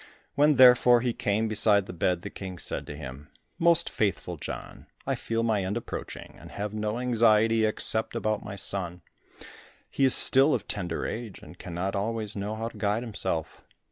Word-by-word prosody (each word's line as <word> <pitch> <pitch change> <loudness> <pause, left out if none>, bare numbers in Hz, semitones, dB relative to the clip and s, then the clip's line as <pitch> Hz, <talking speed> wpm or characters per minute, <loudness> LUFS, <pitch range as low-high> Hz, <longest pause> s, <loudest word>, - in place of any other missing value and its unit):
When 150 +1 +4
therefore 125 -1 +6
he 125 -1 -1
came 110 +2 -1
beside 105 -2 +3
the 90 - -8
bed, 90 0 -1
the - - -6
King 95 -2 -8
said - - -3
to 75 - -7
him, 70 0 -9 0.3
"Most 170 0 +4
faithful 95 -4 -2
John, 75 - -8 0.2
I - - 0
feel 115 0 -2
my 110 -4 +1
end 95 +4 -2
approaching, 120 - -7
and - - -12
have 105 +1 -4
no 105 +1 -2
anxiety 115 -2 +3
except 110 +1 +1
about 110 -1 -1
my 100 - -7
son. 90 -3 -3 0.9
He 140 - -1
is 130 - +4
still 135 +3 +4
of - - -5
tender 90 -5 -4
age, 115 -4 -5
and - - -14
cannot 90 +3 -4
always 110 +1 -3
know 105 +2 -4
how 115 +1 -4
to - - -15
guide 105 +2 0
himself. 100 -8 -3
110 Hz, 180 wpm, -27 LUFS, 95-115 Hz, 0.9 s, therefore